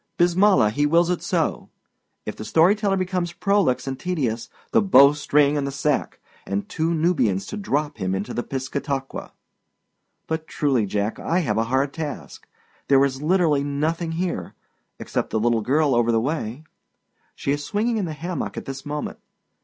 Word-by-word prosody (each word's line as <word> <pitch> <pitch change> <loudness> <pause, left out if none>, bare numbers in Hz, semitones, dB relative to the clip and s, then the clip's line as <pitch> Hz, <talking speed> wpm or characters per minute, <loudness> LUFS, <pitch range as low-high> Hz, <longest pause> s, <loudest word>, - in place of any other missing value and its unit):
Bismillah! 175 - +4
he 145 +6 +1
wills 170 +3 +3
it 180 - -1
so. - - -1 0.6
If - - -5
the - - -7
story 165 - +4
teller 205 -2 0
becomes 180 -2 -2
prolix 200 -11 +1
and 135 -1 -4
tedious 130 -11 -2 0.2
the - - +4
bow 140 -8 +7
string 145 0 +2
and 140 -1 -1
the - - -3
sack, 140 +1 -1 0.2
and 100 +1 -3
two 160 +1 -1
Nubians 155 - +1
to - - -6
drop 150 - -2
him 95 -2 -1
into 100 +2 -4
the - - -1
Piscataqua! 135 +1 -4 1.0
But 160 0 -3
truly, 130 -8 +1
Jack, 105 +2 -2
I 175 +2 0
have 145 - 0
a 115 - +1
hard 135 +3 0
task. 155 -2 -6 0.4
There 140 0 +5
is 135 0 -3
literally 155 -3 +2
nothing 160 +4 -1
here 170 - -3 0.4
except - - -3
the 110 - 0
little 115 0 +2
girl 140 +5 +2
over 120 -1 +3
the 115 - +3
way. 135 0 -3 0.7
She 140 - -2
is 145 +1 -1
swinging 225 +6 0
in 205 - -1
the 160 - -4
hammock 170 +3 -4
at - - -5
this 135 -1 -6
moment. 150 0 -5
145 Hz, 175 wpm, -23 LUFS, 130-170 Hz, 1.0 s, bow